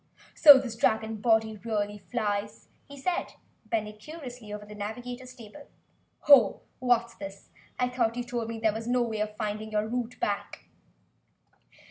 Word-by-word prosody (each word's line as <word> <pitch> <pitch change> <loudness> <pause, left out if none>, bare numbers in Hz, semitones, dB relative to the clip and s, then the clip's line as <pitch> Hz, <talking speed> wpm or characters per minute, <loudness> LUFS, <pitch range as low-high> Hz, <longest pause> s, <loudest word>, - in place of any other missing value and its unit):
"So 290 -3 +10
this 255 -4 -3
dragon 220 -1 +1
body 220 0 +2
really 210 -1 -2
flys?" 205 +1 -3 0.2
he 280 - -11
said, 350 +6 -2 0.3
bending 215 -1 -2
curiously 250 -6 -9
over 210 0 -6
the 210 - -11
navigator's 245 +5 -7
table. 245 +4 -13 0.5
"Ho, 285 -4 +6 0.2
what's 240 -2 +2
this? 195 -2 -10 0.3
I 250 - +1
thought 240 -2 0
you 245 - -1
told 240 -2 -4
me 230 - -4
you 220 -1 +2
had 225 +2 -6
no 245 0 +2
way 220 -2 -3
of 210 0 -3
finding 215 0 -3
the 210 0 0
route 245 +1 -4
back?" 205 -1 -3
225 Hz, 155 wpm, -28 LUFS, 210-245 Hz, 0.5 s, So